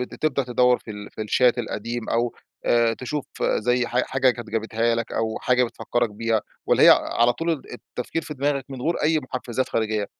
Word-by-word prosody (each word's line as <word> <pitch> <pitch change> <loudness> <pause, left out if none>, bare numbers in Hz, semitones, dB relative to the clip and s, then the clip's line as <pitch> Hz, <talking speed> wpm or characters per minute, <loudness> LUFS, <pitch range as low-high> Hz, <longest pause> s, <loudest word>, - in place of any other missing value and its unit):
بتبدأ 140 +2 -1
تدوَّر 125 0 +3
في 110 - -11
ال 105 0 -8
في - - -6
الChat 120 +3 +3
القديم، 115 0 -4
أو 120 0 0 0.3
آآ، 115 -1 +3
تشوف 140 +4 -4 0.2
زي 125 +2 +1
ح 120 +2 +1
حاجة 130 -1 +2
كانت 120 -2 -7
جابتها 115 +1 0
لك 115 0 -3
أو 110 -1 -1
حاجة 125 0 +3
بتفكّرك 120 0 -1
بيها، 110 +1 0 0.3
والَّا - - +4
هي - - +9
ع - - +10 0.3
على 120 +1 +5
طول 165 +7 -2 0.2
التفكير 125 +5 -5
في 150 - -7
دماغك 140 -1 0
من 130 -2 -6
غير 170 +5 +1
أي 155 +1 +3
محفّزات 130 -1 -3
خارجية؟ 110 -2 -1
120 Hz, 195 wpm, -24 LUFS, 115-130 Hz, 0.3 s, ع